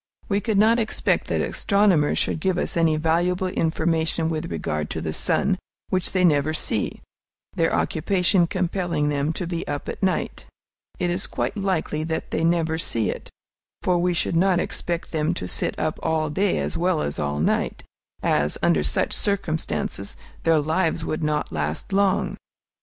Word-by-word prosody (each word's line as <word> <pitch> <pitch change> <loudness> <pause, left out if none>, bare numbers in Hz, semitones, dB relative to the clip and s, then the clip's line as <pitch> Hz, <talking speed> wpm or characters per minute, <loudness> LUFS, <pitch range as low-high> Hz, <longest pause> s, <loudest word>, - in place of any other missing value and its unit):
We 200 0 +1
cannot 220 +2 +3
expect 220 -1 +1
that - - 0
astronomers 200 -7 +2
should - - 0
give 185 +2 0
us - - -1
any 165 -2 +3
valuable 175 +4 +1
information 160 -1 0
with 165 +1 -3
regard 75 0 -2
to - - -3
the 80 -1 -3
sun, - - +1 0.3
which 185 -2 +1
they 185 -1 +3
never 155 -1 +3
see, - - -1 0.5
their - - +2
occupation 180 -2 +2
compelling 170 -4 -1
them 145 +1 0
to 180 - -3
be 170 -1 -3
up 145 0 -4
at - - -5
night. 190 -2 -1 0.5
It 175 -1 0
is 180 +3 0
quite - - -2
likely 185 -6 -1
that 160 0 -3
they - - 0
never 165 -1 +1
see 115 -9 0
it; - - -8 0.5
for 180 -1 +2
we 175 0 +1
should 170 - +1
not 180 +1 +3
expect 170 -1 -3
them 155 -2 0
to 90 - -4
sit - - -1
up - - -1
all 155 -2 0
day 195 +5 +1
as - - -2
well 175 -2 +1
as 70 - -3
all 75 0 -1
night, 80 - 0 0.4
as, 75 0 +1
under 85 -3 +4
such 65 -4 0
circumstances, 160 - -2 0.2
their 165 -1 +3
lives 160 +2 0
would 155 - -2
not 150 -1 -1
last 75 - -3
long. 195 -1 +2
165 Hz, 170 wpm, -24 LUFS, 150-185 Hz, 0.5 s, under